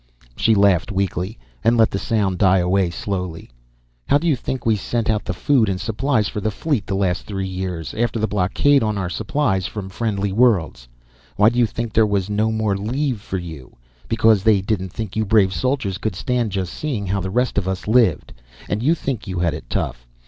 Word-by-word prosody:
She 115 Hz, -1 st, +3 dB
laughed 100 Hz, -1 st, +3 dB
weakly, 95 Hz, 0 st, -2 dB, 0.3 s
and 115 Hz, +1 st, +3 dB
let 110 Hz, -1 st, +4 dB
the 100 Hz, -, -2 dB
sound 100 Hz, -5 st, 0 dB
die 95 Hz, -2 st, +5 dB
away 90 Hz, 0 st, +2 dB
slowly. 90 Hz, -5 st, -5 dB, 0.6 s
"How -, -, +5 dB
do 165 Hz, -, -4 dB
you 155 Hz, -, +3 dB
think 130 Hz, +1 st, -5 dB
we 110 Hz, -1 st, +3 dB
sent 115 Hz, +2 st, -1 dB
out 105 Hz, -1 st, -1 dB
the -, -, -2 dB
food 125 Hz, -8 st, +2 dB
and 95 Hz, -1 st, -2 dB
supplies 110 Hz, 0 st, 0 dB
for 105 Hz, -, -4 dB
the 110 Hz, -, 0 dB
fleet 110 Hz, +1 st, -2 dB
the 95 Hz, -, -1 dB
last 95 Hz, -2 st, -1 dB
three 95 Hz, -2 st, -3 dB
years, 90 Hz, -3 st, -4 dB
after 120 Hz, 0 st, -1 dB
the 110 Hz, -, +1 dB
blockade 105 Hz, +9 st, +2 dB
on 110 Hz, -2 st, 0 dB
our 90 Hz, -3 st, -2 dB
supplies 110 Hz, -4 st, 0 dB
from 100 Hz, -3 st, -6 dB
friendly 100 Hz, -1 st, -2 dB
worlds? 95 Hz, -, +2 dB, 0.5 s
Why 105 Hz, +2 st, +5 dB
do 120 Hz, +1 st, -2 dB
you 120 Hz, -, +4 dB
think 115 Hz, 0 st, -5 dB
there 110 Hz, -1 st, +4 dB
was 100 Hz, -1 st, -1 dB
no 110 Hz, +2 st, +1 dB
more 110 Hz, -2 st, 0 dB
leave 120 Hz, +3 st, -2 dB
for 95 Hz, -, -4 dB
you? 80 Hz, -7 st, -9 dB, 0.3 s
Because 110 Hz, -2 st, +3 dB
they 105 Hz, -1 st, +4 dB
didn't 95 Hz, -1 st, -2 dB
think 105 Hz, +1 st, -6 dB
you 110 Hz, -, +1 dB
brave 100 Hz, -3 st, +3 dB
soldiers 130 Hz, -7 st, -1 dB
could 110 Hz, -4 st, -2 dB
stand 120 Hz, +2 st, -1 dB
just 95 Hz, -2 st, -3 dB
seeing 130 Hz, -10 st, -3 dB
how 95 Hz, +1 st, -1 dB
the 95 Hz, -, -3 dB
rest 125 Hz, +2 st, +1 dB
of 95 Hz, -, -6 dB
us 95 Hz, +1 st, -3 dB
lived! 110 Hz, -9 st, +2 dB, 0.3 s
And 105 Hz, -, -2 dB
you 155 Hz, +7 st, +3 dB
think 130 Hz, -9 st, -4 dB
you 95 Hz, -1 st, -4 dB
had 85 Hz, -2 st, +1 dB
it 75 Hz, -5 st, -8 dB
tough! -, -, -3 dB
105 Hz, 215 wpm, -21 LUFS, 95-115 Hz, 0.6 s, die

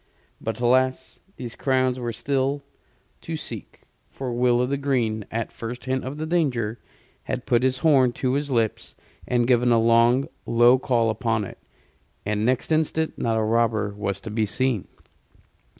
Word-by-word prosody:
But 110 Hz, 0 st, -4 dB
alas! 130 Hz, +2 st, +1 dB, 0.2 s
these 120 Hz, -3 st, -7 dB
crowns 130 Hz, -1 st, +1 dB
were 120 Hz, -1 st, -3 dB
still 135 Hz, +4 st, -1 dB, 0.6 s
to -, -, -5 dB
seek; -, -, -8 dB, 0.3 s
for 130 Hz, -3 st, -5 dB
Will 120 Hz, 0 st, +3 dB
o' 125 Hz, -, +2 dB
th' 140 Hz, +2 st, -2 dB
Green, 115 Hz, -7 st, 0 dB
at 115 Hz, 0 st, -3 dB
first 120 Hz, +2 st, -7 dB
hint 130 Hz, 0 st, -1 dB
of 135 Hz, +3 st, -5 dB
the 155 Hz, -, -3 dB
danger, 125 Hz, -10 st, 0 dB, 0.5 s
had 130 Hz, -1 st, -4 dB
put 120 Hz, -3 st, +2 dB
his 130 Hz, 0 st, +1 dB
horn 135 Hz, -6 st, +4 dB
to 130 Hz, 0 st, -1 dB
his 145 Hz, +1 st, -1 dB
lips 115 Hz, -4 st, -1 dB, 0.3 s
and 120 Hz, -1 st, +2 dB
given 125 Hz, -1 st, +3 dB
a 115 Hz, -, +5 dB
long, 115 Hz, +3 st, +4 dB, 0.2 s
low 120 Hz, +2 st, +5 dB
call 120 Hz, -3 st, +1 dB
upon 110 Hz, 0 st, -1 dB
it, -, -, -11 dB, 0.7 s
and 105 Hz, +1 st, -1 dB
next 125 Hz, +6 st, 0 dB
instant 160 Hz, 0 st, 0 dB
not 115 Hz, -1 st, 0 dB
a 110 Hz, -, +1 dB
robber 110 Hz, -2 st, +1 dB
was 100 Hz, -1 st, -3 dB
to 110 Hz, -, -7 dB
be 110 Hz, 0 st, 0 dB
seen. 125 Hz, -1 st, 0 dB
120 Hz, 165 wpm, -24 LUFS, 115-130 Hz, 0.7 s, a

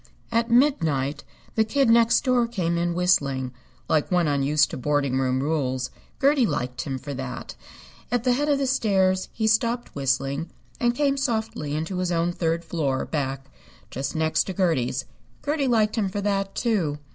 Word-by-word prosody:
At 230 Hz, +1 st, +1 dB
midnight 160 Hz, -, +2 dB, 0.3 s
the 220 Hz, -, +3 dB
Kid 270 Hz, +4 st, +1 dB
Next 230 Hz, 0 st, +5 dB
Door 250 Hz, -3 st, +2 dB
came 180 Hz, -7 st, -1 dB
in 170 Hz, 0 st, 0 dB
whistling, 140 Hz, -8 st, +1 dB, 0.4 s
like 155 Hz, -2 st, +1 dB
one 180 Hz, -3 st, +2 dB
unused 145 Hz, +2 st, +2 dB
to -, -, -4 dB
boarding 140 Hz, -1 st, 0 dB
house 130 Hz, 0 st, +1 dB
rules. 130 Hz, -3 st, -1 dB, 0.3 s
Gertie 275 Hz, -3 st, +4 dB
liked 125 Hz, -5 st, -2 dB
him 135 Hz, -2 st, -3 dB
for 145 Hz, +2 st, -6 dB
that. 130 Hz, -2 st, -6 dB, 0.6 s
At 245 Hz, -2 st, +1 dB
the 250 Hz, -1 st, +3 dB
head 290 Hz, +4 st, 0 dB
of 285 Hz, -, +3 dB
the 275 Hz, -, 0 dB
stairs 190 Hz, -7 st, +1 dB
he 220 Hz, -, -2 dB
stopped 230 Hz, +2 st, +1 dB
whistling 135 Hz, +3 st, -1 dB, 0.3 s
and 240 Hz, 0 st, +2 dB
came 280 Hz, 0 st, +1 dB
softly 220 Hz, -, -2 dB
into 165 Hz, +4 st, -3 dB
his 180 Hz, -1 st, -1 dB
own 170 Hz, 0 st, +1 dB
third 165 Hz, -1 st, -1 dB
floor 145 Hz, -5 st, -1 dB
back 135 Hz, -3 st, -3 dB, 0.5 s
just 135 Hz, +3 st, -4 dB
next 160 Hz, 0 st, +1 dB
to 190 Hz, -, -4 dB
Gertie's. 135 Hz, -8 st, 0 dB, 0.4 s
Gertie 290 Hz, -1 st, 0 dB
liked 220 Hz, -3 st, +2 dB
him 200 Hz, -3 st, 0 dB
for 205 Hz, +2 st, -3 dB
that, 195 Hz, -1 st, -1 dB
too. 190 Hz, -12 st, 0 dB
175 Hz, 170 wpm, -25 LUFS, 140-230 Hz, 0.6 s, Next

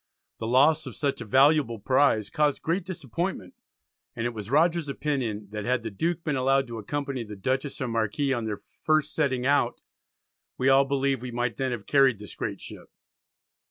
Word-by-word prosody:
The 110 Hz, -, -3 dB
loss 145 Hz, +6 st, +4 dB
of -, -, -8 dB
such 140 Hz, -2 st, -1 dB
a -, -, -5 dB
valuable 135 Hz, +1 st, +4 dB
prize 110 Hz, -1 st, +2 dB
caused 150 Hz, -2 st, +1 dB
great 170 Hz, +4 st, 0 dB
disappointment, 170 Hz, -, -4 dB, 0.6 s
and 115 Hz, -, -3 dB
it 120 Hz, -, -1 dB
was 105 Hz, -2 st, -7 dB
Rogers's 165 Hz, +2 st, +2 dB
opinion, 130 Hz, -8 st, -2 dB
that 105 Hz, -1 st, -4 dB
had 125 Hz, 0 st, 0 dB
the 110 Hz, -, -4 dB
Duke 165 Hz, -, -2 dB
been 150 Hz, -3 st, -1 dB
allowed 135 Hz, +1 st, +2 dB
to 115 Hz, -1 st, -5 dB
accompany 140 Hz, +2 st, -3 dB
the 105 Hz, -1 st, -9 dB
Dutchess 130 Hz, +7 st, -2 dB
and 125 Hz, -3 st, -3 dB
Marquis 115 Hz, +5 st, 0 dB
on 120 Hz, -3 st, -2 dB
their 105 Hz, -2 st, -4 dB, 0.2 s
first 155 Hz, -1 st, +1 dB
setting 130 Hz, -5 st, 0 dB
out 145 Hz, +1 st, +2 dB, 0.8 s
"we 130 Hz, +1 st, +2 dB
all 135 Hz, +1 st, +6 dB
believe 135 Hz, -2 st, 0 dB
we 125 Hz, -, -5 dB
might 120 Hz, -2 st, -2 dB
then 130 Hz, -1 st, -1 dB
have 115 Hz, -4 st, -5 dB
carried 135 Hz, -5 st, +4 dB
this 105 Hz, 0 st, -10 dB
great -, -, -4 dB
ship." -, -, -10 dB
135 Hz, 190 wpm, -26 LUFS, 115-145 Hz, 0.8 s, all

